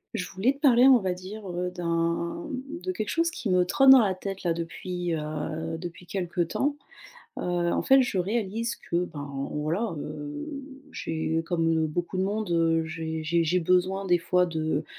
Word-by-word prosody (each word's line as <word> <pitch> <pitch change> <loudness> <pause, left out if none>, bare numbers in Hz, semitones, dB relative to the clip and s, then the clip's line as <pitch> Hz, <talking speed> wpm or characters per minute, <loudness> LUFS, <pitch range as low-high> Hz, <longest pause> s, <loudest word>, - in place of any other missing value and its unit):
Je 180 - -3
voulais 200 +8 +1
te 280 - -18
parler 255 -3 +6
on 260 -3 +7
va 185 -2 -1
dire, 190 +3 -8
heu, 180 +1 -2
d'un, 170 -1 -1
hem, 255 - -4 0.2
de 370 - -1
quelque 215 - -3
chose 330 0 +1
qui 240 - -4
me 180 -1 +4
trotte 270 +9 +4
dans 265 0 +11
la 205 -5 +2
tête, 195 +1 -6
là, 170 -2 +2
depuis, 175 +1 -4
heu, 155 +1 -4
depuis 175 +1 -8
quelque 180 -1 -2
temps, 275 - 0 0.6
heu, - - -4
en 175 -1 0
fait, 270 0 +6
je 240 - -2
réalise 225 +4 -1
que, 175 -5 -1
ben, 145 -4 -7 0.2
voilà, 165 +8 -1
heu, 150 - -6 0.4
j'ai 160 -5 -2
comme, 165 -1 0
heu, 160 - +2
beaucoup 175 +4 -3
de 185 - +1
monde, 205 0 -2
heu, 165 -1 +3
j'ai 160 0 -4
j'ai 170 +1 +2
j'ai 180 +3 +2
besoin 185 +3 +1
des 175 -1 +4
fois 180 +2 +2
de 155 -3 -1
180 Hz, 190 wpm, -27 LUFS, 165-200 Hz, 0.6 s, dans